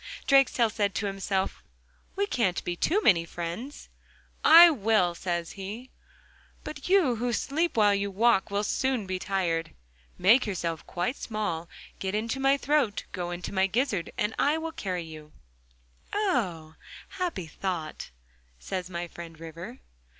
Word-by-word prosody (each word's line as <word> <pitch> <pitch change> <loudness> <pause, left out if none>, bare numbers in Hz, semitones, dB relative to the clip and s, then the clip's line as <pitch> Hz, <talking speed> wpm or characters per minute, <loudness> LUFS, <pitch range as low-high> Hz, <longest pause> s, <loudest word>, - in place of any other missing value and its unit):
Drakestail 260 -4 +4
said 205 -3 -1
to 210 - -1
himself: 195 -1 -2 0.5
'We 400 +1 +1
can't 230 - 0
be 175 - -2
too 380 - +1
many 170 -5 +5
friends.'... 175 - -6 0.6
'I 335 +2 +10
will,' 215 - +2
says 170 -1 -3
he, 210 +6 -8 0.7
'but 305 +1 -7
you 345 -12 +4
who 245 +2 -1
sleep 310 +6 -1
while 205 -2 +5
you 200 0 0
walk 215 +1 +2
will 200 +1 -1
soon 260 0 0
be 185 0 -3
tired. 175 -4 -1 0.4
Make 220 +7 +5
yourself 170 -5 -3
quite 180 +10 -2
small, 205 -7 -3 0.3
get 190 +1 -2
into 230 +5 -2
my 270 +1 +3
throat—go 225 -11 -1
into 175 +2 -5
my 190 0 +3
gizzard 205 -4 -1
and 210 +1 0
I 295 +3 +3
will 325 0 -4
carry 185 - -3
you.' 155 -2 -11 0.8
'Ah! 185 - -1 0.3
happy 360 - -3
thought!' 160 -1 -5 0.5
says 180 - -5
my 175 -1 -4
friend 165 -1 -10
River. 170 +9 -9
200 Hz, 145 wpm, -28 LUFS, 175-255 Hz, 0.8 s, I